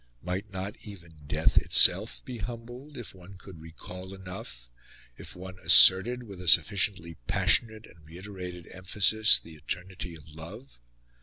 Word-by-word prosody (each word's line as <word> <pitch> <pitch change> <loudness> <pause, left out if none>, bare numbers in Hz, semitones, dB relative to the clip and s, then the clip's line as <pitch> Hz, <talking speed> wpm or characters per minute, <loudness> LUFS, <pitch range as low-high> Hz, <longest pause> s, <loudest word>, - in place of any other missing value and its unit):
Might 95 +4 -5
not 95 +2 -7
even 85 -5 -13
death - - +1
itself - - +3
be 125 -2 -9
humbled, 120 +6 -10
if 120 - -10
one 95 +1 -15
could 90 -4 -14
recall 90 +3 -11
enough 95 - -11 0.5
if - - -12
one 95 +1 -11
asserted, 115 +9 +6
with 100 -5 -12
a 90 - -9
sufficiently 85 0 +1
passionate 110 -1 0
and 80 -2 -20
reiterated 90 +1 -10
emphasis, 105 +3 +2
the 80 - -15
eternity 90 +3 -8
of 80 - -16
love? 85 - -13
95 Hz, 140 wpm, -27 LUFS, 85-105 Hz, 0.5 s, asserted